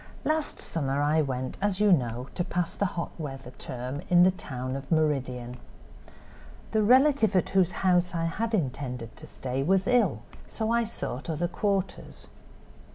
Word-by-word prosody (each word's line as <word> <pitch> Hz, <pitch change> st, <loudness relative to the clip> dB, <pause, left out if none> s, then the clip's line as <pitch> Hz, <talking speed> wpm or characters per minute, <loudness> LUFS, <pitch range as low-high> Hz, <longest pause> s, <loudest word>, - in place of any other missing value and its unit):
"Last 310 Hz, -1 st, 0 dB
summer 140 Hz, -3 st, -2 dB
I 150 Hz, +2 st, +3 dB
went, 130 Hz, -2 st, -3 dB
as 205 Hz, -1 st, +1 dB
you 210 Hz, -1 st, +4 dB
know, 125 Hz, -5 st, +1 dB
to 175 Hz, -, -1 dB
pass 175 Hz, -1 st, -2 dB
the 200 Hz, -, +1 dB
hot 170 Hz, -, -2 dB
weather 135 Hz, -4 st, -6 dB
term 125 Hz, +3 st, -5 dB
in 175 Hz, 0 st, +7 dB
the 185 Hz, -, +6 dB
town 130 Hz, -7 st, -5 dB
of 135 Hz, +2 st, -7 dB
Meridian. 130 Hz, -6 st, 0 dB, 1.1 s
The 220 Hz, -, +2 dB
relative 255 Hz, -2 st, +5 dB
at 185 Hz, -, +2 dB
whose 185 Hz, -2 st, +3 dB
house 180 Hz, -1 st, +3 dB
I 165 Hz, 0 st, 0 dB
had 220 Hz, +7 st, -1 dB
intended 125 Hz, -, -3 dB
to -, -, -11 dB
stay 130 Hz, +1 st, -4 dB
was 190 Hz, +6 st, +2 dB
ill, 245 Hz, 0 st, +2 dB, 0.2 s
so 220 Hz, 0 st, -2 dB
I 235 Hz, 0 st, +2 dB
sought 160 Hz, -, -5 dB
other 165 Hz, +2 st, 0 dB
quarters. 195 Hz, +1 st, -2 dB
165 Hz, 160 wpm, -28 LUFS, 130-195 Hz, 1.1 s, in